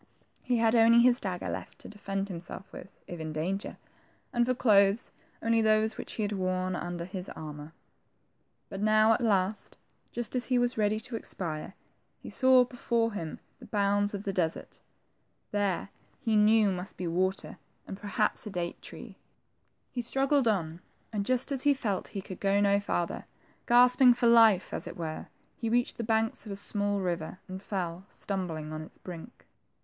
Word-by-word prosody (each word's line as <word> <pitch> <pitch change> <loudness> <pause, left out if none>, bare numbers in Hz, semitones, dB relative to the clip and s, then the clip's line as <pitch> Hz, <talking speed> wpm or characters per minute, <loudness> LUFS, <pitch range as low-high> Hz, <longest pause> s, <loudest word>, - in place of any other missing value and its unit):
He 250 -1 0
had 225 0 +3
only 230 0 +6
his 245 0 +4
dagger 185 -3 -4
left - - -6
to - - -11
defend 195 -1 -4
himself 185 +1 -8
with, 195 - -11
if 175 - -8
in 160 0 -4
danger; 185 +6 -3 0.6
and 240 -1 +2
for 255 - +1
clothes, 205 -2 +3 0.3
only 230 0 +3
those 215 0 +2
which - - -6
he 220 - -2
had 205 - -1
worn 185 -1 -1
under 175 -1 -4
his 185 0 -6
armor. 150 0 -8 1.0
But 195 - -7
now 215 +1 +5
at 225 - -1
last, 205 -2 0 0.3
just 240 0 -3
as 250 - 0
he 255 - +2
was 245 0 +2
ready 215 0 +1
to 240 +1 -6
expire, 170 -5 -5 0.4
he - - -10
saw 260 -1 +5
before 235 -2 -1
him 165 -6 -5 0.2
the - - -12
bounds 205 0 +1
of 200 - -6
the 195 - -2
desert. 165 -3 -2 0.7
There, 200 -2 -1 0.3
he 225 -2 0
knew, 210 -1 +5
must 180 +2 -6
be 180 - -4
water, 185 +3 -1 0.3
and - - -6
perhaps 210 +2 -1
a - - -4
date 175 -3 -4
tree. - - -10 0.7
He 250 - -3
struggled 270 +2 +2
on, 170 -5 -1 0.3
and 205 -1 -2
just 255 +2 +1
as 270 -2 -1
he 285 0 +4
felt 205 -8 -2
that - - -13
he 195 - -4
could 185 -3 -8
go 200 0 +2
no 200 0 +3
farther, 175 -4 -2 0.4
gasp 245 +2 +5
ing 250 -2 +8
for 245 - 0
life, 225 -5 +5
as - - -3
it - - -8
were, 160 -2 -5 0.3
he 230 - -2
reached 245 +2 +1
the 235 - -3
banks 220 0 0
of - - -6
a - - -3
small 205 0 0
river, 175 -2 -3
and 185 0 -7
fell, 185 -3 -4
stumbling, 165 -6 -4
on 155 - -4
its 155 - -11
brink. 180 +6 -10
205 Hz, 185 wpm, -29 LUFS, 185-230 Hz, 1.0 s, ing